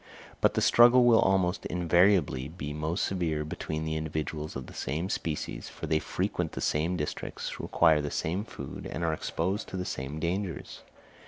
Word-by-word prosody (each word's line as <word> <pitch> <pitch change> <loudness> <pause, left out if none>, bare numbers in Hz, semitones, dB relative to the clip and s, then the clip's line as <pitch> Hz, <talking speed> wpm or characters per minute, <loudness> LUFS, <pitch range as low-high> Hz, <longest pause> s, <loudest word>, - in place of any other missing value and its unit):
But - - +3
the - - +2
struggle 120 +1 +7
will 115 -2 +6
almost 95 -1 +2
invariably 85 -6 +3
be 75 -2 -6
most 80 +4 -1
severe 80 -5 -1
between 80 0 -4
the 80 0 -2
individuals 80 0 -3
of 65 - -5
the - - -12
same 80 +8 -3
species, 80 -5 -3
for - - -7
they 80 - +2
frequent - - -2
the - - -4
same 85 +4 0
districts, 75 -2 -4
require 80 -3 +3
the 75 - -3
same 85 +7 -1
food, - - -8
and 85 - -3
are 80 -1 +1
exposed 95 +6 -2
to 95 - -5
the 90 - -3
same 70 +1 -4
dangers. 90 +2 -3
80 Hz, 175 wpm, -29 LUFS, 75-90 Hz, -, struggle